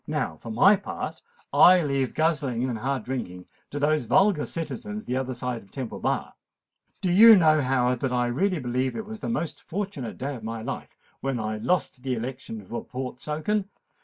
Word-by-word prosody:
"Now, 80 - -2
for 115 - -10
my 195 - +5
part, 200 - -6 0.3
I 180 -1 +7
leave 140 -3 -1
guzzling 145 -6 +1
and 120 -4 -3
hard 135 0 -1
drinking 90 -9 -5 0.2
to 145 - -6
those 150 -2 +1
vulgar 190 - +3
citizens 210 +6 -5
the 125 - -2
other 130 -1 -2
side 120 -1 -3
of 100 - -20
Temple 125 +2 -6
Bar. - - -1 0.7
Do 180 - +1
you 220 +5 +9
know, 155 -5 +5
Howard, 125 -2 +1
that 130 - -1
I 125 -1 +1
really 180 +11 +1
believe 130 -1 -1
it 220 - -4
was 220 0 -8
the - - -4
most 170 -9 -3
fortunate 190 - -5
day 140 +3 -3
of 115 - -10
my 115 0 -5
life - - -6 0.2
when 135 -3 -2
I 110 0 -2
lost 140 +1 0
the 130 -1 -1
election 115 -3 -6
for 120 +5 -5
Portsoken? 150 - -3
135 Hz, 190 wpm, -26 LUFS, 120-170 Hz, 0.7 s, you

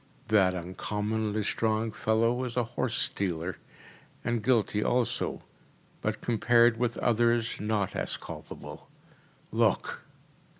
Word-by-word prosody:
That 95 -4 +4
uncommonly 105 +4 -2
strong 110 +1 0
fellow 115 +3 +1
is 125 -1 -4
a 125 - +3
horse 120 +1 -2
stealer, 90 -3 -1 0.6
and 120 -1 0
guilty 105 -4 +2
also, 120 -1 0 0.6
but - - -2
compared 120 0 +4
with 120 0 0
others 120 0 +2
not 105 -2 0
as - - -2
culpable. - - -9 0.6
Look! - - +1
110 Hz, 110 wpm, -29 LUFS, 105-120 Hz, 0.6 s, That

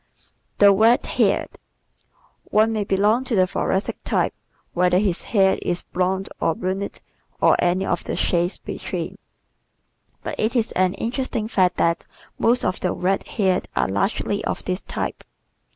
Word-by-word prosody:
The 200 -1 +7
Red 225 +4 +4
Haired - - +1
¶ - - -20 0.9
One 220 +1 +2
may 215 -2 0
belong 205 +5 +2
to 245 - -1
the 185 -2 +4
Thoracic 190 +1 -1
type - - 0 0.4
whether 180 0 +3
his 190 -3 +1
hair 195 -3 +2
is 175 0 -2
blonde 190 +1 -1
or 165 - +1
brunette 190 +2 -3 0.4
or - - +5
any 180 +2 +1
of 175 - -1
the - - -3
shades 175 +1 0
between, - - -5 1.0
but - - -5
it 220 +4 0
is 230 -2 +1
an 185 0 +1
interesting 235 -2 -2
fact 185 -5 +2
that 170 0 +1 0.3
most 240 +2 +3
of 185 - -1
the 180 - -1
red 190 +2 -1
haired 190 -4 0
are - - +2
largely 200 - -1
of - - -3
this 185 +1 -2
type. - - -4
190 Hz, 155 wpm, -22 LUFS, 180-215 Hz, 1.0 s, The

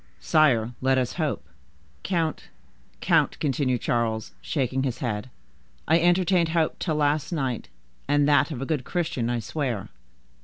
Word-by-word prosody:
"Sire, 130 -8 +3
let 130 0 +3
us 125 -2 0
hope." 145 -8 -2 0.5
"Count, 165 -4 -1 0.6
count," - - +2
continued 130 -4 0
Charles, 115 -2 -1
shaking 135 -3 -1
his 130 -3 -2
head, 110 -1 -3 0.6
"I 160 +2 +5
entertained 175 0 +3
hope 160 -1 0
till 160 -4 -1
last 150 +1 +1
night, 135 -8 -2 0.4
and 145 0 +3
that 145 +2 +4
of 135 -5 -4
a - - -3
good 145 -3 -1
Christian, 160 -9 -2
I 120 - 0
swear." 120 -4 -3
140 Hz, 145 wpm, -25 LUFS, 120-160 Hz, 0.6 s, I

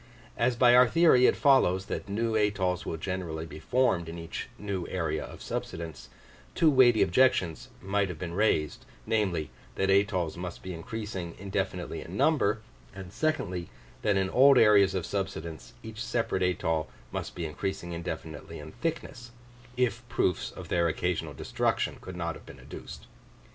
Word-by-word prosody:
As 120 +1 +1
by 120 0 +6
our 125 0 +8
theory 160 -5 +5
it - - +3
follows 95 -10 +4
that - - -5
new 115 +3 -1
atolls 100 -4 0
will 80 - -3
generally 85 -2 -4
be 80 -2 -9
formed 90 -4 +1
in 85 - -7
each 85 -1 -6
new 100 -4 -4
area - - -2
of - - -10
subsidence, 80 -1 -5 0.5
two 160 -2 +5
weighty 125 -4 +6
objections 90 - +2
might 100 0 0
have 90 - -6
been 85 +1 -5
raised, 90 -7 +1 0.2
namely, 95 -9 0 0.2
that 95 0 +1
atolls 95 -4 +2
must 90 0 -6
be 95 - -5
increasing 95 -1 -5
indefinitely 95 -2 -3
in 90 +4 -7
number; 110 -9 +2 0.3
and 95 -2 -9
secondly, 95 - -1 0.3
that 105 -2 +2
in 95 -1 0
old 135 +1 +7
areas 100 -4 +6
of 90 -4 -1
subsidence 85 -10 -5
each 110 +1 -6
separate 115 -5 -1
atoll 80 -3 0 0.2
must - - -5
be 85 - -3
increasing 85 +3 -4
indefinitely 80 -2 -6
in 75 +1 -9
thickness, 135 - -4 0.5
if 120 -3 +1
proofs 90 - 0
of - - -10
their 85 -1 +2
occasional 90 +1 -2
destruction - - -1
could 95 - -8
not 85 -1 -2
have - - -14
been - - -12
adduced. - - -10
95 Hz, 160 wpm, -29 LUFS, 85-110 Hz, 0.5 s, our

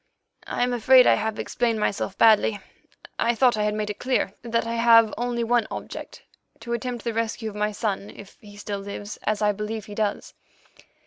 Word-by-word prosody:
"I - - -1
am 250 0 0
afraid 255 +2 +6
I - - +6
have 220 0 -2
explained 230 -2 -1
myself 200 -2 -2
badly. 215 -1 +4 0.6
I 235 +1 +2
thought 245 0 +4
I 215 - -1
had 210 0 0
made 210 -1 -2
it 205 - -10
clear 250 -6 0
that 230 -1 -1
I 230 - -3
have 230 -1 +5
only 240 0 -2
one 230 -1 +1
object—to 235 +1 -9
attempt 240 0 -4
the 235 - -2
rescue 225 0 -2
of - - -14
my 210 0 0
son, 205 -1 -3
if 200 - -13
he 205 -1 -14
still 205 -1 -5
lives, 205 +1 -7
as 215 0 0
I 210 - +4
believe 210 +1 -5
he 210 - -10
does. 205 -1 -2
220 Hz, 195 wpm, -24 LUFS, 210-235 Hz, 0.6 s, afraid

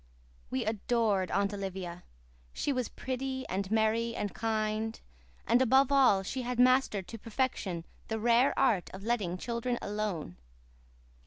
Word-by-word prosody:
We 130 - -1
adored 215 -3 +1
Aunt 200 +2 +1
Olivia; 190 -3 -5 0.5
she 285 - -1
was 255 -3 -1
pretty 260 +1 -4
and 190 +1 -2
merry 225 +1 +1
and 205 - -3
kind; 220 0 -1 0.5
and, 245 - +4
above 265 +2 +4
all, 255 -9 +5
she 255 +7 -3
had 245 0 -3
mastered 250 -7 +3
to 230 - -7
perfection 210 -7 -2 0.2
the 220 - -2
rare 235 +4 +3
art 230 -9 +2
of 195 - -9
letting 205 -6 -1
children 235 +4 -2
alone. 205 - -3
220 Hz, 140 wpm, -31 LUFS, 195-245 Hz, 0.5 s, all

